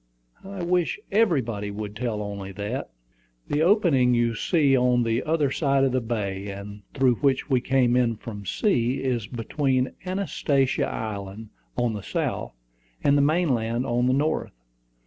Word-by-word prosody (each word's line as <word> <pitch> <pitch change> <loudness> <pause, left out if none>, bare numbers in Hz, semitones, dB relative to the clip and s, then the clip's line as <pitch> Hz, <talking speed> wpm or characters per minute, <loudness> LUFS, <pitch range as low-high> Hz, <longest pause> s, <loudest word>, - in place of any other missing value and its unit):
"I 195 -2 -6
wish 180 - +1
everybody 130 - +1
would 105 0 -6
tell 115 -3 -2
only 100 -1 -6
that." 105 +6 -4 0.6
"The 145 - +1
opening 160 - +4
you 120 -1 +2
see 140 +4 +2
on 125 -1 +3
the 115 +1 0
other 150 -3 +1
side 140 -3 +2
of 135 - +2
the 130 0 +1
bay, 100 -4 -3
and 100 +1 -8
through 130 -4 +3
which 140 0 +1
we 130 -2 +3
came 125 -1 +2
in 120 -2 +2
from 105 -1 -8
sea, 125 - +1
is 120 -5 -1
between 130 +2 -1
Anastasia 175 -8 0
Island 105 0 -5 0.3
on 120 -2 +1
the 105 - -5
south, - - -3 0.5
and 140 - +4
the 145 - +4
main 160 +4 +2
land 115 +2 -1
on 120 +1 +1
the 130 - +3
north. 145 - 0
125 Hz, 160 wpm, -25 LUFS, 110-145 Hz, 0.6 s, opening